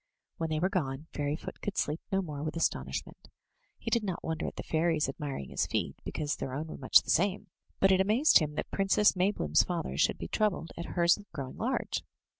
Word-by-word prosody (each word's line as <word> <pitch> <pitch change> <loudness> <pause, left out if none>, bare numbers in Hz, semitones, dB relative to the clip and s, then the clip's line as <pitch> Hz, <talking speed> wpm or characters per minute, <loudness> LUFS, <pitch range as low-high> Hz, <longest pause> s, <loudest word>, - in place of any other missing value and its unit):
When 165 -1 -2
they 155 0 0
were 180 - +2
gone, 145 -6 -2
Fairyfoot 145 +2 -3
could 205 - -4
sleep 150 +2 0
no 195 0 +1
more 150 -4 -6
with 155 +1 -3
astonishment. 165 - -2 0.5
He - - -5
did 235 -2 +2
not 185 -4 -3
wonder 160 -1 -2
at - - -6
the - - -5
fairies 160 -2 +1
admiring 135 - -5
his - - 0
feet, - - -1
because 150 -1 -2
their 130 -1 -4
own 150 +3 -3
were - - -7
much 130 - +6
the - - -1
same; 195 +4 +1 0.3
but 195 - +5
it 190 0 +5
amazed 220 +10 +5
him 150 -2 -2
that - - -4
Princess 195 +1 +4
Maybloom*s 180 - +3
father 65 +1 -3
should - - +3
be 85 - -5
troubled 200 - 0
at 170 - -5
hers 170 +2 +5
growing 140 -5 -6
large. 255 +4 -1
165 Hz, 210 wpm, -30 LUFS, 145-190 Hz, 0.5 s, much